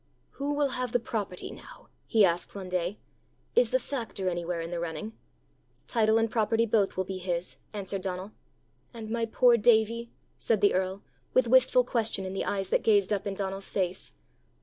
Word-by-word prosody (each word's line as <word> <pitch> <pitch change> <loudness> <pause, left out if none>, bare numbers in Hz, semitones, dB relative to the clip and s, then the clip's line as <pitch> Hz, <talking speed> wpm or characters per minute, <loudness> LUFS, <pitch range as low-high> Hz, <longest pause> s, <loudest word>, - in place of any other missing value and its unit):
"Who 285 +1 -3
will 290 -1 +2
have 250 -2 -3
the 245 - +4
property 210 -5 -4
now?" - - -13 0.2
he 220 -4 +5
asked 175 +1 -1
one 190 -2 -6
day. 180 +2 -1 0.6
"Is 485 +2 +5
the - - +3
factor 230 - -3
anywhere 175 -1 -3
in 165 +1 -5
the 175 - -2
running?" 170 +6 -4 0.7
"Title 220 -2 +3
and 225 -1 +1
property 225 0 +2
both 210 -4 +1
will 190 - +1
be 190 0 -5
his," 175 -1 -3
answered 195 -2 -3
Donal. 185 +2 -4 0.6
"And 220 -1 -7
my 230 0 0
poor 240 +1 +5
Davie?" 230 +1 +3 0.3
said 225 -3 +1
the 205 - +5
earl, 190 +1 -1 0.3
with 255 -2 +4
wistful 255 0 +5
question 225 -5 -1
in 185 - -4
the 195 - -2
eyes 195 -2 -2
that - - +2
gazed 205 -2 +3
up 200 0 -2
in 195 - -3
Donal's 195 0 -2
face. 185 -1 -2
205 Hz, 185 wpm, -28 LUFS, 185-230 Hz, 0.7 s, he